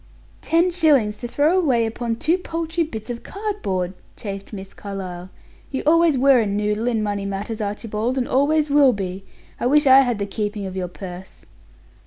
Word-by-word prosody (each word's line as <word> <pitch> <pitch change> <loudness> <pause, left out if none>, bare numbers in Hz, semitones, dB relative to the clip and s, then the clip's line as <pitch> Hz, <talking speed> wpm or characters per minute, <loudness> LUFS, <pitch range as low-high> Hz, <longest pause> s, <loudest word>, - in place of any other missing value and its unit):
"Ten 340 +2 +2
shillings 285 -12 +3
to 240 - -4
throw 300 +9 +2
away 255 -9 +2
upon 230 +1 -3
two 315 +9 +1
paltry 330 -1 -2
bits 225 -6 -6
of 235 - -6
cardboard!" 390 - -3 0.2
chafed 200 -2 -7
Miss 195 -2 -8
Carlyle. 185 -3 -7 0.4
"You 265 - -3
always 330 -1 +4
were 270 0 +5
a 220 - +1
noodle 210 +3 -1
in 225 -3 0
money 205 -1 -2
matters, 205 +3 -4
Archibald, 215 +4 -2
and 250 - 0
always 295 +2 +2
will 280 -3 +6
be. 195 -1 -5 0.3
I - - 0
wish 295 +3 +4
I 265 0 +8
had 245 -4 +2
the 200 - -2
keeping 205 0 -3
of 190 -1 -6
your 185 -1 -2
purse!" 180 +1 -10
230 Hz, 180 wpm, -22 LUFS, 200-290 Hz, 0.4 s, I